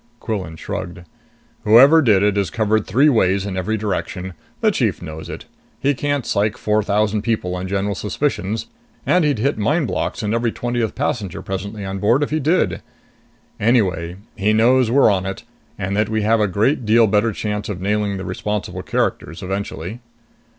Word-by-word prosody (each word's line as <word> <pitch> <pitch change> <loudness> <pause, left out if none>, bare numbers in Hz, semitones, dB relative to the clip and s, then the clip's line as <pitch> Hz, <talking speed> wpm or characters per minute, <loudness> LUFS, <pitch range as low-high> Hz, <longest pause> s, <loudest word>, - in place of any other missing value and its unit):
Quillan 95 -8 -4
shrugged. 90 +2 -6 0.6
"Whoever 130 +9 +7
did 105 -8 +4
it 105 -1 +2
is 100 -4 0
covered 110 +1 0
three 135 +7 +4
ways 100 -7 +2
in 100 -2 -4
every 95 +4 -1
direction. 95 -3 -3 0.3
The - - +4
chief - - 0
knows 80 0 -8
it. - - -7 0.3
He 140 +1 +2
can't 145 -1 -1
psych 105 +3 0
four 105 -2 +1
thousand 105 +1 +1
people 105 -5 -1
on 90 +1 -4
general 100 +1 -1
suspicions, 105 0 -2 0.4
and 180 -1 +3
he'd 145 -4 +1
hit 135 +3 0
mind 150 +9 +1
blocks 115 - -3
in 105 +1 -1
every 115 0 +1
twentieth 120 -2 -2
passenger 100 -6 -2
presently 100 +2 -5
on 95 0 -4
board 115 +8 +3
if 145 - -3
he 155 - +1
did. 160 +6 +1 0.8
Anyway 95 -7 +1 0.2
he 105 +2 +1
knows 120 +2 +4
we're 130 -2 +5
on 95 -1 -1
it, 95 - -5 0.3
and 95 +2 -2
that 105 0 +1
we 110 -1 0
have 110 +2 +3
a 105 - +2
great 110 - +1
deal 115 +1 +5
better 105 +2 +2
chance 105 0 -3
of 95 -4 -4
nailing 100 +1 -1
the 95 - -6
responsible 105 -1 -3
characters 85 - -2
eventually." 95 +1 -4
105 Hz, 180 wpm, -20 LUFS, 95-115 Hz, 0.8 s, Whoever